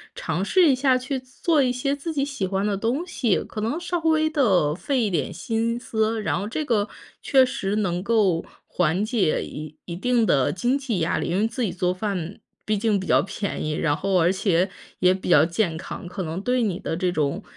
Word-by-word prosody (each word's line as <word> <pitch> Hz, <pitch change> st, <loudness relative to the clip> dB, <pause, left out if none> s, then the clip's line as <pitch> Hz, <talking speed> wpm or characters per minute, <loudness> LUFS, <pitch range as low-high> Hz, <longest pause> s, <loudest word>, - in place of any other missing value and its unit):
尝 170 Hz, +3 st, -2 dB
试 350 Hz, -, +4 dB
一 -, -, +5 dB
下 260 Hz, 0 st, +3 dB
去 265 Hz, +1 st, -3 dB
做 280 Hz, +5 st, 0 dB
一 255 Hz, -, +2 dB
些 250 Hz, +3 st, -1 dB
自 290 Hz, +3 st, -4 dB
己 280 Hz, -2 st, 0 dB
喜 275 Hz, -9 st, -2 dB
欢 195 Hz, +1 st, -1 dB
的 205 Hz, -1 st, 0 dB
东 240 Hz, -, -1 dB
西， 240 Hz, -, 0 dB
可 215 Hz, -, -7 dB
能 225 Hz, +8 st, -1 dB
稍 350 Hz, 0 st, -2 dB
微 315 Hz, -1 st, +2 dB
地 200 Hz, -, +2 dB
费 245 Hz, -, -1 dB
一 215 Hz, -, +1 dB
点 165 Hz, -7 st, -1 dB
心 225 Hz, +6 st, -1 dB
思。 220 Hz, -2 st, -1 dB
然 185 Hz, -, 0 dB
后 200 Hz, -, -4 dB
这 280 Hz, +8 st, -2 dB
个 220 Hz, -6 st, +1 dB, 0.3 s
确 265 Hz, -2 st, +5 dB
实 205 Hz, -5 st, -2 dB
能 180 Hz, -4 st, 0 dB
够 200 Hz, -6 st, +2 dB, 0.2 s
缓 180 Hz, +3 st, +1 dB
解 215 Hz, -7 st, +1 dB
一 155 Hz, 0 st, -8 dB
一 170 Hz, -, -5 dB
定 235 Hz, +5 st, +2 dB
的 135 Hz, -9 st, +2 dB
经 240 Hz, +9 st, +1 dB
济 255 Hz, -9 st, -2 dB
压 165 Hz, +1 st, 0 dB
力， -, -, -2 dB
因 180 Hz, -, 0 dB
为 215 Hz, -, +2 dB
自 235 Hz, +3 st, -5 dB
己 205 Hz, -, 0 dB
做 180 Hz, -1 st, 0 dB
饭， 185 Hz, -2 st, -4 dB, 0.3 s
毕 215 Hz, -1 st, +1 dB
竟 215 Hz, 0 st, +1 dB
比 190 Hz, -, -5 dB
较 -, -, +4 dB
便 200 Hz, +1 st, -4 dB
宜， 155 Hz, -, -1 dB
然 150 Hz, -1 st, +1 dB
后 195 Hz, +3 st, +1 dB
而 170 Hz, +2 st, +4 dB
且 190 Hz, -1 st, +1 dB, 0.3 s
也 180 Hz, 0 st, +5 dB
比 190 Hz, -, -6 dB
较 155 Hz, -4 st, +7 dB
健 170 Hz, 0 st, 0 dB
康， 165 Hz, -, -7 dB
可 185 Hz, +2 st, -5 dB
能 165 Hz, +2 st, -4 dB
对 250 Hz, +3 st, +1 dB
你 190 Hz, -5 st, -1 dB
的 160 Hz, -, -3 dB
这 180 Hz, +1 st, 0 dB
种 155 Hz, +4 st, -1 dB
210 Hz, 245 characters per minute, -24 LUFS, 180-250 Hz, 0.3 s, 较